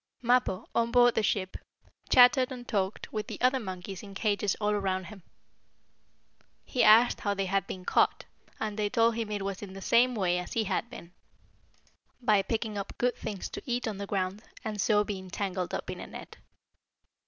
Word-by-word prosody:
Mappo, 240 Hz, -6 st, +2 dB
on 235 Hz, 0 st, +1 dB
board 245 Hz, -1 st, +5 dB
the -, -, +1 dB
ship, 190 Hz, -3 st, -1 dB, 0.5 s
chattered 250 Hz, +1 st, +6 dB
and 245 Hz, -2 st, -8 dB
talked 195 Hz, -2 st, -2 dB
with 215 Hz, -1 st, -3 dB
the -, -, -7 dB
other 255 Hz, +1 st, +3 dB
monkeys 190 Hz, -3 st, -6 dB
in 200 Hz, -2 st, -11 dB
cages 205 Hz, -1 st, 0 dB
all 210 Hz, -1 st, +1 dB
around 190 Hz, -2 st, -1 dB
him. 195 Hz, +2 st, -11 dB, 1.4 s
He 255 Hz, -, +1 dB
asked 230 Hz, +3 st, +6 dB
how 205 Hz, -1 st, -1 dB
they 195 Hz, 0 st, -1 dB
had 195 Hz, +1 st, 0 dB
been 185 Hz, -1 st, -7 dB
caught, -, -, +2 dB, 0.3 s
and 215 Hz, -1 st, -3 dB
they 205 Hz, -1 st, +1 dB
told 230 Hz, 0 st, +3 dB
him 225 Hz, -1 st, -3 dB
it 205 Hz, -2 st, -3 dB
was 195 Hz, -1 st, -4 dB
in 195 Hz, -2 st, -8 dB
the 195 Hz, -, -8 dB
same 245 Hz, +5 st, +3 dB
way 180 Hz, -4 st, +1 dB
as 180 Hz, -, -6 dB
he 225 Hz, -, +1 dB
had 215 Hz, +3 st, -2 dB
been 175 Hz, -7 st, -11 dB, 1.1 s
by 215 Hz, -5 st, +3 dB
picking 220 Hz, -1 st, -3 dB
up 200 Hz, -, -7 dB
good 245 Hz, 0 st, +1 dB
things 200 Hz, -3 st, -5 dB
to -, -, -7 dB
eat 245 Hz, 0 st, -1 dB
on 210 Hz, -3 st, -4 dB
the 200 Hz, -, -5 dB
ground, 195 Hz, +1 st, -2 dB, 0.2 s
and 210 Hz, -2 st, -2 dB
so 210 Hz, 0 st, +3 dB
being 190 Hz, -3 st, -6 dB
tangled 185 Hz, -1 st, -3 dB
up -, -, -4 dB
in -, -, -7 dB
a -, -, -7 dB
net. -, -, -10 dB
210 Hz, 195 wpm, -29 LUFS, 195-235 Hz, 1.4 s, chattered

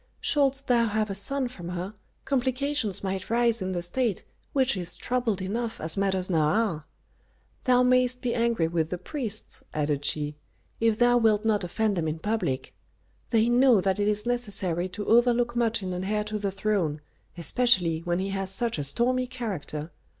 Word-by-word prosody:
"Shouldst 275 Hz, -2 st, +2 dB
thou 235 Hz, -2 st, +3 dB
have 215 Hz, -1 st, -1 dB
a -, -, -1 dB
son 260 Hz, +7 st, 0 dB
from 180 Hz, -9 st, -8 dB
her, 180 Hz, +3 st, -4 dB, 0.3 s
complications 260 Hz, -5 st, 0 dB
might 190 Hz, -1 st, -3 dB
rise 235 Hz, -1 st, +2 dB
in 185 Hz, 0 st, -2 dB
the 175 Hz, -1 st, -2 dB
State, 220 Hz, +3 st, -1 dB, 0.3 s
which 265 Hz, -3 st, +2 dB
is 180 Hz, -1 st, -5 dB
troubled 235 Hz, -6 st, -1 dB
enough 225 Hz, +4 st, -3 dB
as 160 Hz, 0 st, +1 dB
matters 190 Hz, -2 st, +1 dB
now 170 Hz, -4 st, +1 dB
are. 180 Hz, -5 st, 0 dB, 0.8 s
Thou 250 Hz, 0 st, +5 dB
mayst 250 Hz, 0 st, +3 dB
be 240 Hz, -1 st, 0 dB
angry 230 Hz, -8 st, +1 dB
with 165 Hz, -1 st, -1 dB
the 180 Hz, -, -3 dB
priests," 220 Hz, -, -5 dB
added 145 Hz, -1 st, 0 dB
she, 150 Hz, +1 st, 0 dB, 0.5 s
"if 225 Hz, -1 st, +2 dB
thou 245 Hz, +1 st, +4 dB
wilt 220 Hz, -2 st, +2 dB
not 210 Hz, -3 st, +2 dB
offend 210 Hz, +4 st, 0 dB
them 165 Hz, -3 st, -1 dB
in 155 Hz, +1 st, -2 dB
public. 175 Hz, -9 st, -2 dB, 0.6 s
They 225 Hz, -1 st, +3 dB
know 245 Hz, -2 st, +5 dB
that 190 Hz, +1 st, 0 dB
it 205 Hz, -, +1 dB
is 210 Hz, +1 st, 0 dB
necessary 200 Hz, -7 st, 0 dB
to 205 Hz, +3 st, -6 dB
overlook 240 Hz, +1 st, +3 dB
much 230 Hz, -3 st, +1 dB
in 185 Hz, -1 st, -3 dB
an 180 Hz, +1 st, -3 dB
heir 210 Hz, +1 st, 0 dB
to 210 Hz, 0 st, -4 dB
the 200 Hz, -1 st, -1 dB
throne, 195 Hz, -6 st, -1 dB, 0.4 s
especially 175 Hz, -2 st, +3 dB
when 175 Hz, +1 st, -1 dB
he 190 Hz, +2 st, -2 dB
has 195 Hz, -1 st, -3 dB
such 225 Hz, -1 st, -1 dB
a -, -, -1 dB
stormy 250 Hz, -, +1 dB
character. 185 Hz, -, -5 dB
210 Hz, 180 wpm, -27 LUFS, 180-240 Hz, 0.8 s, Thou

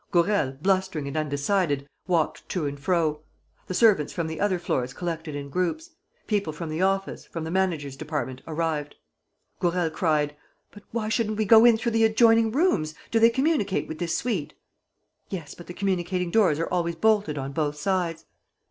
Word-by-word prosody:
Gourel, 175 Hz, -6 st, +2 dB
blustering 185 Hz, -4 st, 0 dB
and 140 Hz, -, -5 dB
undecided, 145 Hz, 0 st, 0 dB, 0.2 s
walked 170 Hz, -4 st, 0 dB
to 175 Hz, -5 st, -1 dB
and 140 Hz, 0 st, -4 dB
fro. 155 Hz, -1 st, 0 dB, 0.5 s
The 185 Hz, -, -4 dB
servants 205 Hz, -10 st, +4 dB
from 170 Hz, -, -2 dB
the 160 Hz, 0 st, -5 dB
other 200 Hz, -3 st, +1 dB
floors 130 Hz, -7 st, -2 dB
collected 165 Hz, -3 st, -4 dB
in 140 Hz, -1 st, -6 dB
groups. 305 Hz, -, -2 dB, 0.3 s
People 200 Hz, -7 st, 0 dB
from 160 Hz, +1 st, -6 dB
the 155 Hz, +3 st, -2 dB
office, 195 Hz, +1 st, 0 dB
from 165 Hz, -, -6 dB
the 160 Hz, -, -4 dB
manager's 170 Hz, -7 st, -1 dB
department 145 Hz, -3 st, -4 dB
arrived. 155 Hz, -2 st, -2 dB, 0.6 s
Gourel 175 Hz, -2 st, +1 dB
cried: 150 Hz, -3 st, 0 dB, 0.4 s
"But 205 Hz, -, -13 dB
why 220 Hz, -2 st, -2 dB
shouldn't 215 Hz, -2 st, 0 dB
we 215 Hz, -, +1 dB
go 225 Hz, +2 st, +7 dB
in 235 Hz, -2 st, +7 dB
though 235 Hz, +1 st, -1 dB
the 225 Hz, 0 st, +2 dB
adjoining 225 Hz, 0 st, +5 dB
rooms? 225 Hz, -, +1 dB, 0.2 s
Do 225 Hz, -, +3 dB
they 230 Hz, +1 st, +7 dB
communicate 260 Hz, -5 st, 0 dB
with 160 Hz, -, -7 dB
this 170 Hz, -1 st, -1 dB
suite?" 200 Hz, -12 st, -2 dB, 0.7 s
"Yes; 165 Hz, -7 st, -6 dB
but 175 Hz, -, -13 dB
the 175 Hz, -, -7 dB
communicating 180 Hz, -2 st, -1 dB
doors 185 Hz, -9 st, +4 dB
are 165 Hz, -, 0 dB
always 170 Hz, -2 st, -1 dB
bolted 205 Hz, -5 st, +2 dB
on 135 Hz, 0 st, -4 dB
both 150 Hz, 0 st, -1 dB
sides." 170 Hz, -1 st, -1 dB
175 Hz, 175 wpm, -26 LUFS, 155-205 Hz, 0.7 s, go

